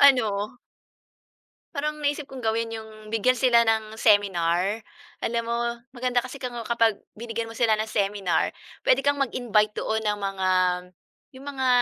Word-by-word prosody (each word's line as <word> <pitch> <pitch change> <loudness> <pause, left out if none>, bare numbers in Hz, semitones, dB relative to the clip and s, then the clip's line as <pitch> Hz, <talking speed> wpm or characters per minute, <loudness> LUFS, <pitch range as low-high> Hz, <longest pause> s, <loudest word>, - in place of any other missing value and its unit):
ano 225 -5 +4 1.2
parang 300 +1 -1
naisip 290 0 0
kong 265 -3 -9
gawin 225 +1 +1
'yong 220 -1 -10
bigyan 240 +3 +3
sila 235 -1 +5
ng 220 -1 0
seminar. 200 -1 +2 0.4
Alam 230 0 0
mo, 235 0 0 0.4
maganda 245 0 +1
kasi 255 +3 -7
kango 245 -3 -5
kapag 230 -3 +2 0.2
binigyan 230 0 -4
mo 225 - -9
sila 225 -3 +3
ng 220 - -1
seminar, 200 -3 0 0.3
puwede - - +4
kang 285 0 +2
mag-invite 225 -5 +2
doon 220 0 -1
ng 210 -1 0
mga 195 -1 -1 0.9
'yong 270 +2 -11
mga 265 -2 -1
225 Hz, 145 wpm, -25 LUFS, 210-250 Hz, 1.2 s, sila